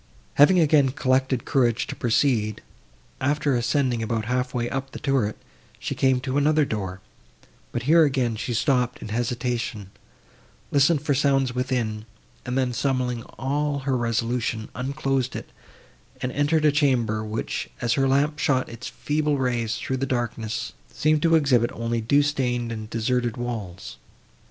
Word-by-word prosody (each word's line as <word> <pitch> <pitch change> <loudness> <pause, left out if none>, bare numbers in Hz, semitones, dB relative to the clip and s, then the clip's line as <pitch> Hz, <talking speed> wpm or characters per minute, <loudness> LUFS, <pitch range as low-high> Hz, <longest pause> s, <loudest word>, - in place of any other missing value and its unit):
Having 175 +6 +6
again 150 -4 +4
collected 130 -1 0
courage 120 -3 +2
to - - -6
proceed, 115 -3 +1 0.6
after 145 +1 +1
ascending 125 0 +1
about 110 -1 -1
half 125 +2 -1
way 120 -2 -1
up 135 +1 -4
the - - -6
turret, 130 -7 0 0.4
she - - -4
came 130 -1 +2
to 130 +2 0
another 150 +1 +3
door, 95 -5 -4 0.7
but 120 - -3
here 160 +5 +6
again 130 -6 +1
she 115 +2 -3
stopped 125 -1 +1
in - - -7
hesitation; 120 -3 -2 0.8
listened 145 +1 +3
for 150 - +1
sounds 135 -2 +2
within, 120 -4 -2 0.4
and 125 +1 -1
then, 130 -2 +1
summoning 125 -2 -1 0.2
all 145 +1 -1
her 135 -1 0
resolution, 115 -1 -1
unclosed 130 0 -1
it, - - -7 0.7
and 130 -1 -2
entered 150 +3 +1
a 150 - +6
chamber, 125 -7 +1
which, 110 +1 -3
as 120 - +1
her 135 0 +2
lamp 145 +3 +1
shot 130 -3 +1
its 115 +1 -8
feeble 150 -1 -1
rays 120 -4 0
through 130 - -3
the 135 +1 -2
darkness, 115 -2 -3 0.2
seemed 155 0 +2
to 165 0 +4
exhibit 130 -7 +3
only 115 0 -2
dew 140 +6 +3
stained 125 -5 -1
and 110 -1 -6
deserted 120 +1 -1
walls. 115 -7 -5
125 Hz, 150 wpm, -24 LUFS, 115-140 Hz, 0.8 s, Having